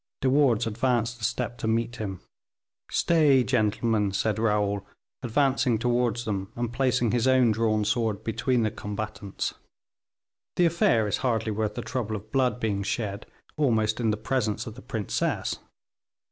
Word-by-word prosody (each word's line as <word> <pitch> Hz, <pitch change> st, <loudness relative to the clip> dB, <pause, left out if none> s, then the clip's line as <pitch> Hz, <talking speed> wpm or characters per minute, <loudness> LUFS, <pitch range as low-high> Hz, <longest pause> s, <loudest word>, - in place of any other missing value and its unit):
De 130 Hz, -, +2 dB
Wardes 130 Hz, -5 st, +3 dB
advanced 120 Hz, +1 st, 0 dB
a -, -, -9 dB
step 120 Hz, 0 st, -2 dB
to 110 Hz, -, -2 dB
meet 115 Hz, +2 st, 0 dB
him. 95 Hz, -5 st, -5 dB, 0.7 s
"Stay, 150 Hz, -6 st, +4 dB
gentlemen," 110 Hz, -3 st, +1 dB
said 105 Hz, +2 st, 0 dB
Raoul, 105 Hz, -2 st, +1 dB, 0.4 s
advancing 130 Hz, -1 st, +2 dB
towards 120 Hz, 0 st, 0 dB
them, 95 Hz, -3 st, -3 dB
and 120 Hz, 0 st, -3 dB
placing 125 Hz, -3 st, +1 dB
his 120 Hz, +1 st, +1 dB
own 130 Hz, -3 st, +5 dB
drawn 110 Hz, -1 st, +1 dB
sword 110 Hz, -2 st, 0 dB
between 115 Hz, +2 st, 0 dB
the 110 Hz, -, 0 dB
combatants, 105 Hz, -1 st, -4 dB, 1.0 s
"the 175 Hz, -, +4 dB
affair 140 Hz, -10 st, +3 dB
is 105 Hz, -, 0 dB
hardly 115 Hz, -3 st, 0 dB
worth 105 Hz, 0 st, -2 dB
the 120 Hz, -, -4 dB
trouble 115 Hz, -4 st, -3 dB
of 105 Hz, +1 st, -9 dB
blood 130 Hz, -2 st, +1 dB
being 105 Hz, -4 st, -1 dB
shed 100 Hz, 0 st, -3 dB, 0.3 s
almost 110 Hz, -7 st, +2 dB
in 115 Hz, -2 st, +1 dB
the 105 Hz, -, 0 dB
presence 110 Hz, -1 st, -1 dB
of 110 Hz, -, -7 dB
the 125 Hz, -, -12 dB
princess. 110 Hz, -6 st, -2 dB
115 Hz, 155 wpm, -26 LUFS, 105-125 Hz, 1.0 s, own